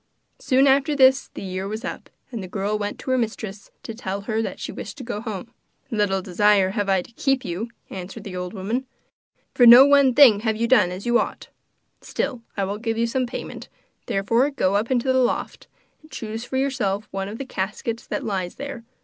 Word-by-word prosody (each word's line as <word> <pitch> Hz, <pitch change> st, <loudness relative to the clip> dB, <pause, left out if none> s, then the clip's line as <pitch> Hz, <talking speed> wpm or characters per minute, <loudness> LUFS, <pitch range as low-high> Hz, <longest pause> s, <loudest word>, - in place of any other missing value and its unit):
Soon 265 Hz, 0 st, +3 dB
after 275 Hz, +2 st, +3 dB
this 265 Hz, 0 st, +4 dB
the -, -, -6 dB
year 190 Hz, 0 st, -4 dB
was 215 Hz, +4 st, -5 dB
up, -, -, -6 dB, 0.2 s
and 230 Hz, -4 st, -5 dB
the 185 Hz, -, -7 dB
girl 200 Hz, +3 st, -2 dB
went 205 Hz, -1 st, -3 dB
to 260 Hz, -, -4 dB
her 255 Hz, -, +2 dB
mistress 215 Hz, -3 st, -4 dB
to 225 Hz, -, -6 dB
tell 200 Hz, -3 st, -4 dB
her 220 Hz, +2 st, -1 dB
that -, -, -5 dB
she -, -, -5 dB
wished -, -, -8 dB
to 265 Hz, -, -7 dB
go 230 Hz, -3 st, -4 dB
home. 225 Hz, +1 st, -6 dB, 0.4 s
'Little 200 Hz, -4 st, 0 dB
desire 195 Hz, +1 st, +3 dB
have 205 Hz, -1 st, -2 dB
I 190 Hz, -2 st, +2 dB
to -, -, -17 dB
keep 270 Hz, +2 st, 0 dB
you,' 190 Hz, +7 st, -4 dB, 0.2 s
answered 190 Hz, +3 st, -7 dB
the 195 Hz, -4 st, -7 dB
old 180 Hz, 0 st, -4 dB
woman, 225 Hz, +7 st, -3 dB, 0.7 s
'for 245 Hz, -, +6 dB
no 245 Hz, +3 st, +11 dB
one 280 Hz, -3 st, +5 dB
thing 250 Hz, -8 st, +8 dB
have 220 Hz, 0 st, 0 dB
you 230 Hz, +1 st, 0 dB
done 220 Hz, -8 st, +5 dB
as 185 Hz, +2 st, -7 dB
you 240 Hz, 0 st, +3 dB
ought. -, -, -4 dB, 0.5 s
Still, 260 Hz, -4 st, -3 dB, 0.2 s
I 200 Hz, -, +1 dB
will 200 Hz, +2 st, -3 dB
give 225 Hz, 0 st, -2 dB
you 230 Hz, -, +2 dB
some 250 Hz, +2 st, -1 dB
payment, 240 Hz, -, -7 dB, 0.4 s
therefore 230 Hz, +8 st, +2 dB
go 200 Hz, -9 st, 0 dB
up 210 Hz, +3 st, 0 dB
into 260 Hz, 0 st, +1 dB
the 260 Hz, -, +3 dB
loft, 250 Hz, -, -1 dB, 0.3 s
and 310 Hz, -, -19 dB
choose 225 Hz, -4 st, -6 dB
for 260 Hz, -, -3 dB
yourself 220 Hz, -7 st, -1 dB
one 195 Hz, 0 st, -3 dB
of 215 Hz, -, -7 dB
the 275 Hz, -, -5 dB
caskets 225 Hz, +1 st, -4 dB
that -, -, -3 dB
lies 185 Hz, -4 st, -3 dB
there. 280 Hz, -4 st, -7 dB
225 Hz, 215 wpm, -23 LUFS, 195-255 Hz, 0.7 s, no